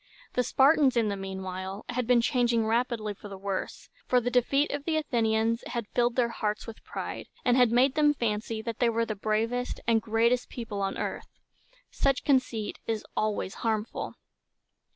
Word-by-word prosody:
The 250 - +2
Spartans, 270 +1 +4
in 225 -2 +3
the 200 - -1
mean 190 -1 -5
while, 190 +2 -5
had 245 -1 -2
been 245 -1 +5
changing 235 -2 +2
rapidly 225 -2 0
for 205 - -11
the 195 -1 -8
worse, 195 0 -4 0.2
for 250 - +4
the 245 +1 -2
defeat 275 +4 +2
of 285 0 -3
the 320 -2 +1
Athenians 230 -5 +1
had 235 -3 -3
filled 240 -1 +1
their 245 -2 +2
hearts 210 -2 -2
with 225 -1 -10
pride, - - -6 0.2
and 245 - +4
had 250 -3 +5
made 255 +3 +4
them 295 -1 +3
fancy 220 -2 -2
they 235 +1 0
were 230 0 +1
the 220 - -3
bravest 225 +4 -1
and 225 -1 +3
greatest 230 +3 +1
people 215 -4 -5
on 195 0 -1
earth. - - -4 0.6
Such 275 -2 +1
conceit 250 -6 +1
is 220 -2 -2
always 215 -3 -1
harmful. 220 -1 -2
230 Hz, 175 wpm, -28 LUFS, 215-250 Hz, 0.6 s, been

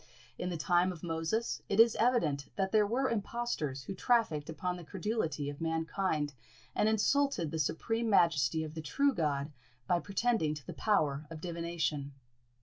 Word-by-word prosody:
In 180 - -2
the 175 - -3
time 175 +4 +2
of 170 -4 -10
Moses, 165 +7 -1
it 200 - 0
is 230 0 +7
evident 165 - +2
that 190 -1 0
there 215 -2 +4
were 260 +5 +1
impostors 210 - -2
who 195 - -5
trafficked 190 -8 +1
upon 180 +3 -2
the 175 - -9
credulity 175 -5 -2
of 145 +1 -6
mankind, 160 -2 -1 0.4
and 215 - +2
insulted 220 - +2
the 160 - -3
supreme 225 +10 0
majesty 160 - +3
of 155 -1 -6
the 160 - -5
true 275 - +2
God 150 - -1 0.3
by 175 +4 +2
pretending 200 -5 0
to 150 -4 -10
the - - -6
power 150 -8 +1
of 165 -1 -7
divination. 165 -4 -2
170 Hz, 165 wpm, -32 LUFS, 155-220 Hz, 0.4 s, is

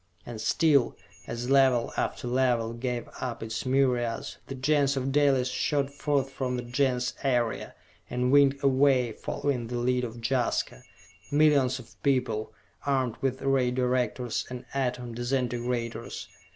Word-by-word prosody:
And 115 -2 -7
still, 145 -3 +3 0.3
as 120 +2 -3
Level 130 -3 +4
after - - -2
Level 120 -2 +1
gave 120 0 -3
up 125 -3 -4
its 115 +3 -4
myriads, 125 -3 0
the 135 - -5
Gens 140 +1 +2
of 135 +1 -1
Dalis 135 -3 +3
shot 140 +1 0
forth 140 -1 0
from 130 -2 -2
the 125 - -4
Gens 125 0 0
area, 120 -4 0 0.3
and 125 +1 0
winged 140 0 +4
away, 135 -3 +4
following 125 +2 -2
the 120 +1 -3
lead 125 +1 +1
of 120 -1 -5
Jaska. 125 - 0 0.5
Millions 145 -4 +4
of 125 -3 -14
people, 125 -6 0 0.3
armed 130 -4 0
with 135 0 -1
Ray 135 -2 +2
Directors 125 -1 -1
and 125 -1 -7
Atom 125 -3 -2
Disintegrators. 120 -1 -2
125 Hz, 140 wpm, -28 LUFS, 120-135 Hz, 0.5 s, Level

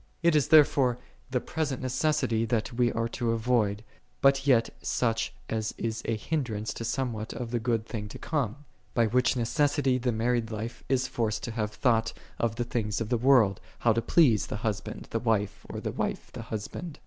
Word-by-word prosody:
14. 170 - +6
It 160 - +2
is, 150 - +3
therefore, 140 -5 +5 0.3
the 130 -1 +1
present 145 -2 -3
MC< 130 -3 +1
that 115 0 -1
we 120 0 +2
are 115 0 0
to 115 -1 -1
.ivoid, 110 -3 +1 0.4
but 135 0 +3
yet 120 -4 +4
such 115 -2 0 0.2
as 110 -1 -2
is 115 0 -2
a 115 - 0
hindrance 110 -4 -2
to - - -6
somewhat 115 -2 -2
of 120 -2 -5
the 120 - 0
good 115 -1 0
things 105 -3 -5
to - - -7
come; 145 -2 -2 0.3
by 115 - +4
which 125 +4 +2
necessity 135 +2 +2
the 125 0 0
married 115 0 0
life 110 +2 -5
is 130 0 +2
forced 110 -4 -2
to 120 - -3
have 110 -2 -1
thought 110 +1 +1 0.3
of 115 -2 0
the 120 - -1
things 110 -4 -2
of 115 -2 -3
the 125 - +2
world, 120 -7 +4 0.2
how 115 - +3
to 115 - 0
please, 120 - +4
the - - -4
husband 105 -1 -3
the 115 - 0
wife, 110 -4 -1
or - - -5
the - - -3
wife - - -3
the - - -7
husband. 130 +9 -5
115 Hz, 195 wpm, -28 LUFS, 110-130 Hz, 0.4 s, 14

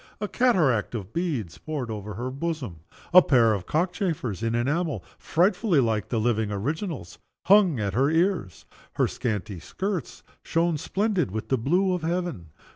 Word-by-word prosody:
A 210 - -2
cataract 160 - +2
of 105 -2 -6
beads 145 - -2
poured 145 -7 -4
over 105 -1 -6
her 125 +4 -4
bosom. 135 - -4 0.3
A 185 - +10
pair 120 -8 +4
of 95 -4 -4
cock 175 +4 0
chafers 150 - -2
in 115 0 0
enamel 145 +6 -1 0.2
(frightfully 180 0 +2
like 110 -5 0
the 115 - 0
living 110 -2 0
originals) 130 - -4 0.3
hung 190 - +5
at 100 -2 -1
her 135 +6 +3
ears. 165 - 0 0.3
Her - - +2
scanty 105 -6 -3
skirts 190 - -4 0.2
shone 165 -2 0
splendid 195 - 0
with 110 +3 -5
the 130 - +2
blue 180 +10 +2
of 180 - -2
heaven. 165 - -2
140 Hz, 160 wpm, -26 LUFS, 110-175 Hz, 0.3 s, A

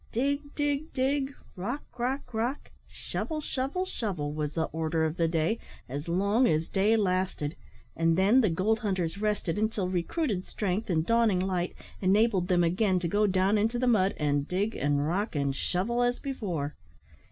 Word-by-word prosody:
Dig, 285 +4 -1
dig, 290 +1 -1
dig; 270 +1 0 0.2
rock, 235 +11 -3 0.2
rock, 250 +1 -2
rock; 235 +6 -2 0.2
shovel, 315 -2 -4
shovel, 290 +5 -2
shovel, 180 - -3
was 150 -1 -2
the 165 - 0
order 160 0 0
of 160 0 -1
the 165 -2 +2
day, 165 +7 0 0.3
as 145 +5 -5
long 200 +8 +3
as 155 -2 +1
day 210 +4 +3
lasted; 185 -6 0 0.4
and 165 0 +2
then 205 +8 +5
the 215 - +3
gold 200 +7 +1
hunters 190 -5 -1
rested 210 -4 -1
until 215 -3 0
recruited 185 - -1
strength 205 +2 -2
and 160 -3 +1
dawning 230 -4 +3
light 180 -1 -1 0.3
enabled 195 -1 +3
them 180 -1 +3
again 185 +3 +2
to 175 -1 -1
go 210 +4 +2
down 190 +2 +2
into 225 +3 +1
the 255 - 0
mud 205 -6 +3
and 145 -1 0
dig, 200 +5 -1
and 145 +1 +1
rock, 195 +3 -1
and 140 -2 0
shovel 205 - 0
as 245 0 +2
before. 180 - -3
195 Hz, 170 wpm, -29 LUFS, 170-235 Hz, 0.4 s, then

